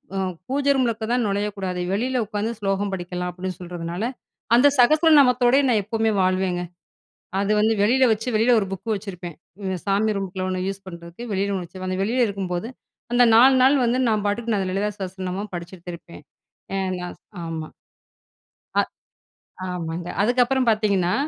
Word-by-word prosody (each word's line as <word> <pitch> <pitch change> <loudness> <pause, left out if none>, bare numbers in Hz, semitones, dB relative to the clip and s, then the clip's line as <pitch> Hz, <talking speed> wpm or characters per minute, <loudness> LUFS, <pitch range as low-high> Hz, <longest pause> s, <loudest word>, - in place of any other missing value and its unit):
அ - - -1 0.3
"பூஜ 280 +2 -1
room 260 - +2
உள்ளுக்க 225 -1 -2
தான் 245 -2 +2
நொழையக்கூடாது. 195 -3 -2
வெளில 250 +4 0
உக்காந்து 210 +2 -2
ஸ்லோகம் 195 0 -1
படிக்கலாம்" 180 0 -4
அப்டின்னு 185 +1 -5
சொல்றதுனால, 175 +2 -5 0.5
அந்த 265 +4 +6
"சகஸ்வர 310 +5 +5
நாமத்தோடயே" 250 +1 +4
நான் 215 -4 +3
எப்பவுமே 225 +1 0
வாழ்வேங்க. 185 -1 +1 0.8
அது 200 +1 0
வந்து 220 +1 +3
வெளியில 255 +4 +4
வச்சு, 225 +3 -6
வெளியில 235 +3 +4
ஒரு 195 - -2
புக் 205 +4 -3
வச்சிருப்பேன். 180 -4 -7 0.3
இந்த 190 -1 -1
சாமி 205 +2 +1
ரூமுக்குள்ள 190 -1 -3
ஒண்ணு 185 0 -2
யூஸ் 195 0 -7
பண்றதுக்கு, 170 +6 -9
வெளியில 200 +1 0
ஒண்ணு 180 -2 -3
வச்சு, 185 +1 -8
அந்த 185 - -2
வெளியில 240 +3 +2
இருக்கும்போது, 195 +2 -3 0.4
அந்த 245 0 +6
4 260 +3 +7
நாள் 275 +2 +5
வந்து 250 +2 +1
நான் 210 -1 0
பாட்டுக்கு, 230 +2 -1
நான் 190 -2 -1
"லலிதா 205 +2 0
சாஸனமா" 185 +1 -4
படிச்சுட்த்துருப்பேன். 170 0 -9 0.6
ஏனா 185 -2 -3 0.4
ஆமா. 160 -1 -5 1.1
ஆ - - +7 0.9
ஆமாங்க. 170 -1 -4
அதுக்கப்புறம் 245 +2 +2
பாத்தீங்கன்னா, 200 -5 +1
200 Hz, 150 wpm, -23 LUFS, 185-230 Hz, 1.1 s, 4